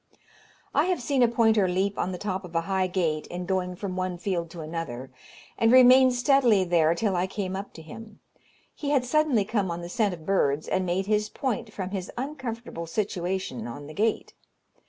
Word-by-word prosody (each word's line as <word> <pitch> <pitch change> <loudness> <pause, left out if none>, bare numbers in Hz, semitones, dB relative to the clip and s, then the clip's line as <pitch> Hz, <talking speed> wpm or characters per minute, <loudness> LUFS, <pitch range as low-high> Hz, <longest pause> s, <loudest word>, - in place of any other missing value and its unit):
I - - +3
have 365 -1 0
seen 265 +2 0
a 240 - +6
pointer 225 -4 +3
leap 190 +2 -1
on 185 - -1
the 180 - -4
top 190 0 -3
of 175 -2 -11
a 165 - +3
high 190 +1 0
gate, 165 -4 -1
in 180 +1 -5
going 180 -1 -1
from 190 0 -5
one 185 -1 -2
field 170 -2 -2
to 165 0 -8
another, 155 -6 -5 0.5
and 225 0 +4
remain 255 +1 +8
steadily 245 -5 +3
there 170 -2 +3
till 200 +1 0
I 180 +1 +1
came 190 -1 -4
up 200 +1 -6
to 160 - -11
him. 215 +7 -11 0.5
He 285 - -4
had 275 -4 +2
suddenly 275 -6 +2
come 205 -3 -1
on 170 0 -4
the 170 - -7
scent 205 -2 0
of 160 -2 -15
birds, 155 -6 +1
and 185 -1 0
made 185 +2 0
his 210 +1 +1
point 230 -4 -3
from 190 -2 -5
his 190 -2 -4
uncomfortable 240 - -5
situation 180 - -3
on 145 +5 -8
the 155 - -9
gate. 220 +5 -1
190 Hz, 200 wpm, -26 LUFS, 175-225 Hz, 0.5 s, remain